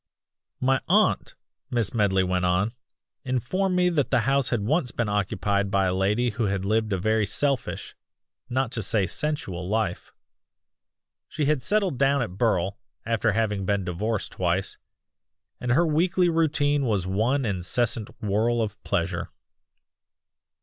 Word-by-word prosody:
"My 130 +1 +2
aunt," - - +2 0.3
Miss 115 -5 0
Medley 100 -4 +2
went 90 0 0
on, 90 +5 +1 0.5
"informed 140 - 0
me 180 0 +3
that 150 -6 0
the - - +3
house 135 -1 +2
had 120 -4 0
once 130 - +1
been 120 -1 -1
occupied 100 -1 0
by 100 -1 +2
a 90 - +1
lady 105 +6 +1
who 115 +2 -1
had 95 -1 -1
lived 110 +1 +1
a 95 - +1
very 110 +2 +1
selfish 135 +4 -1 0.6
not 130 -1 0
to 115 - -3
say 100 0 +1
sensual 95 - -3
life. 105 -4 -1 1.2
She 150 - -2
had 150 -2 +1
settled 190 -3 0
down 140 -1 +3
at 115 - -5
Burle, 100 -3 0 0.3
after 115 -1 +1
having 105 -2 0
been 100 0 0
divorced 105 +5 -2
twice, 95 +2 -1 0.8
and 125 - -2
her 170 +6 +4
weekly 175 +3 +2
routine 145 -3 +1
was 100 -5 0
one 115 +8 +1
incessant 110 +3 0
whirl 110 +4 +1
of 105 -2 -3
pleasure. 90 -2 -1
110 Hz, 145 wpm, -25 LUFS, 100-135 Hz, 1.2 s, her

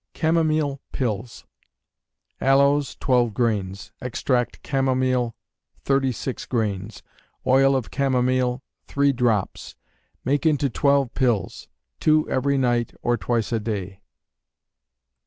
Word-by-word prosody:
Chamomile 155 -4 +1
Pills. 115 -2 -3 1.0
Aloes, 140 +1 +3
twelve 120 -5 +1
grains; 100 -5 -1
extract 125 0 -1
chamomile, 130 -3 0 0.5
thirty 135 -1 +2
six 125 +2 -5
grains; 105 -3 -3 0.4
oil 135 +1 +4
of 130 -4 -2
chamomile, 130 -1 +1 0.2
three 140 0 +2
drops; 115 -6 -1 0.5
make 140 +4 +1
into 145 -4 +2
twelve 140 -1 +2
pills: 120 -7 -1 0.3
two 155 0 +3
every 140 +1 +1
night, 120 -2 0
or 120 - +2
twice 120 -1 -1
a 115 - +1
day. 100 -3 -5
130 Hz, 100 wpm, -23 LUFS, 115-140 Hz, 1.0 s, oil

